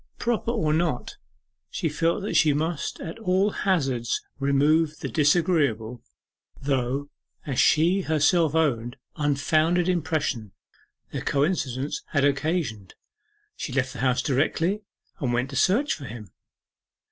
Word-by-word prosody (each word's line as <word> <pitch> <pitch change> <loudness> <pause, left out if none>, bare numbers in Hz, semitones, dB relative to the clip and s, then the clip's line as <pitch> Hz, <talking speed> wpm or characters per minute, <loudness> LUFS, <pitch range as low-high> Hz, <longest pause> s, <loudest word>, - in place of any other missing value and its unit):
Proper 235 -1 -1
or 185 -11 +1
not, 160 -5 -1 0.5
she - - -2
felt 165 +5 0
that 205 - -3
she 150 -2 +5
must 160 +1 -2
at 170 +5 -7
all 195 0 +2
hazards 135 - 0 0.2
remove 150 +3 +2
the - - -5
disagreeable, 145 - +1 0.6
though, 135 +1 -1 0.3
as 135 -4 -2
she 175 +5 +4
herself 160 0 +2
owned, 120 -7 0 0.2
unfounded 155 +4 +2
impression 150 - -1 0.6
the - - -4
coincidence 140 -3 -1
had 140 -2 +3
occasioned. 140 - -1 0.6
She - - -5
left 130 -1 0
the - - -8
house 125 -1 +1
directly, 165 +8 0 0.4
and 130 -6 -1
went 125 +3 -1
to - - -6
search 210 - +2
for 145 - -7
him. 110 -4 -9
150 Hz, 125 wpm, -25 LUFS, 135-170 Hz, 0.6 s, she